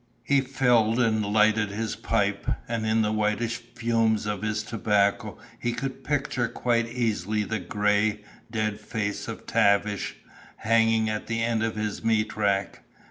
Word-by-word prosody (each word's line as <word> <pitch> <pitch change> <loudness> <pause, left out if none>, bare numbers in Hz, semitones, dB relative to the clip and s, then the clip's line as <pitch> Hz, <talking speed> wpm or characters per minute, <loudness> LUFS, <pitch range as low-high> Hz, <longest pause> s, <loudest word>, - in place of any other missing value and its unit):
He 140 -1 +3
filled 125 -4 +2
and 110 -3 +2
lighted 105 +1 +3
his 110 +2 -3
pipe, - - -1 0.2
and 115 -2 -2
in 110 0 +3
the 105 - 0
whitish 110 +2 0 0.2
fumes 115 -3 +1
of 105 -2 -2
his 105 0 -1
tobacco 105 -3 0 0.2
he 120 - -1
could 135 +2 -5
picture 130 -3 0
quite 115 0 0
easily 110 -3 -1
the 110 +2 -2
gray, 105 +2 +1 0.3
dead 110 -2 -2
face 105 -1 -3
of - - -7
Tavish, 100 0 +1 0.4
hanging 115 0 +2
at 110 0 -3
the 115 0 -1
end 115 -1 0
of 110 0 -1
his 105 0 -3
meat 110 -1 +1
rack. 100 -2 0
110 Hz, 150 wpm, -26 LUFS, 105-115 Hz, 0.4 s, He